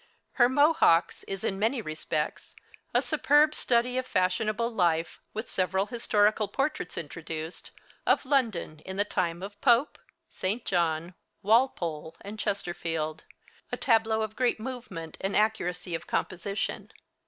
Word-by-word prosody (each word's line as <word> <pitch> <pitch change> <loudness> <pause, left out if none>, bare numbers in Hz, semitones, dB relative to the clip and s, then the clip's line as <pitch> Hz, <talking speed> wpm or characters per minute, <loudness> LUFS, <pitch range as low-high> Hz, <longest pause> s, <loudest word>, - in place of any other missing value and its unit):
Her 240 -2 +4
'Mohawks' 285 - +4
is 195 -1 -5
in 195 - -1
many 230 +5 +1
respects 155 -4 -3 0.4
a - - +2
superb 295 +2 +4
study 250 0 +1
of 255 - -5
fashionable 215 +5 +1
life, 170 -6 +1
with 220 +2 -5
several 190 +1 0
historical 215 -2 +2
portraits 275 - -2
introduced, 160 +1 -6 0.4
of - - +3
London 225 - 0
in 190 0 -6
the 205 - +2
time 175 -3 -1
of 205 +1 -8
Pope, 245 +2 +3 0.3
St. 210 +6 -2
John, 170 -1 0 0.3
Walpole, 180 - +1
and 210 +2 -8
Chesterfield 165 -6 -2 0.5
a - - -2
tableau 225 -2 +2
of 215 0 -5
great 250 -3 +1
movement 215 -10 -6
and 195 +1 -1
accuracy 180 -5 0
of 165 +1 -4
composition. 195 +3 -2
200 Hz, 130 wpm, -28 LUFS, 170-235 Hz, 0.5 s, Her